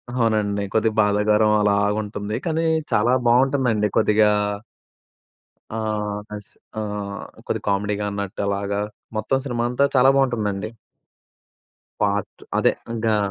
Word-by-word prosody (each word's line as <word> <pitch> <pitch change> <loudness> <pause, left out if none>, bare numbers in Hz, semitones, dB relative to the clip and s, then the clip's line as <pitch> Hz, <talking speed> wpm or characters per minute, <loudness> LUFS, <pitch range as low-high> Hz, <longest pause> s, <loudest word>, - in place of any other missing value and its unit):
అవునండి. 105 -4 +1
కొద్దిగా 110 0 +1
బాధాకరం 105 +1 +3
అలాగుంటుంది 105 0 0
కానీ 165 0 0 0.3
చాలా 115 +4 +3
బాగుంటుందండి 125 -3 +3
కొద్దిగా 105 0 +4 1.5
ఆ! - - -2 0.6
అస్ 105 -1 -10 0.3
ఆహ్, 105 -1 -6
కొద్దిగా - - -3
కామెడీగా 105 +1 0
అన్నట్టు 100 -1 -4
అలాగా 100 0 -1 0.4
మొత్తం 120 +5 +1
సినిమా 120 -3 -1
అంతా 125 +3 +2
చాలా 130 +1 +6
బాగుంటుందండి! 110 -6 0 1.3
పార్ట్ 100 -1 -1 0.2
అదే - - +3 0.2
ఇంగా 110 -1 +1
105 Hz, 105 wpm, -22 LUFS, 100-115 Hz, 1.5 s, చాలా